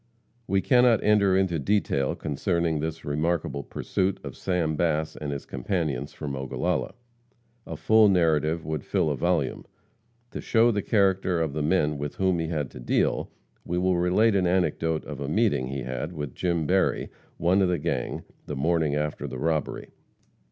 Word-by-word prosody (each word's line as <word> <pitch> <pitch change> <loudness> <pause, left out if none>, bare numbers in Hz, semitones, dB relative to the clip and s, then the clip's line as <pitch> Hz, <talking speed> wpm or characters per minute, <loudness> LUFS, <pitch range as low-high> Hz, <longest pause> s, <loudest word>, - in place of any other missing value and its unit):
We 95 0 +2
cannot 125 -2 +4
enter 100 -3 +4
into 95 -4 +1
detail 70 -5 0
concerning 80 +1 -1
his 80 +1 -4
remarkable 75 0 -1
pursuit 95 +6 -2
of - - -7
Sam 85 -4 -1
Bass 80 -1 0
and 75 -1 -5
his 70 - -5
companions, 70 0 -2
from 70 -3 -5
Ogallala. 65 -1 -2 0.7
A 80 - -6
full 110 +6 +5
narrative 80 -3 +2
would 80 -3 -3
fill 75 - 0
a - - -1
volume. - - 0 0.7
To - - -5
show 115 +1 +3
the 105 -2 -1
character 95 -4 +2
of 80 -4 -1
the 75 - -2
men 75 -2 +1
with 70 0 -4
whom 95 -2 +1
he 80 - -2
had 75 -5 -3
to - - -10
deal, - - 0 0.3
we 90 - -3
will 90 0 +2
relate 100 +6 +3
an 95 -2 +2
anecdote 80 -3 0
of - - -7
a 70 0 -4
meeting 100 - +1
he 70 0 -4
had 65 +7 -4
with 75 -5 -5
Jim 85 -3 -1
Berry, 95 +5 +1 0.3
one 90 +4 +3
of 95 - +3
the 90 - +1
gang, 70 - -3 0.2
the 75 - -4
morning 80 +1 +1
after 75 0 -2
the 65 - -6
robbery. 80 +3 -2
80 Hz, 175 wpm, -26 LUFS, 75-95 Hz, 0.7 s, full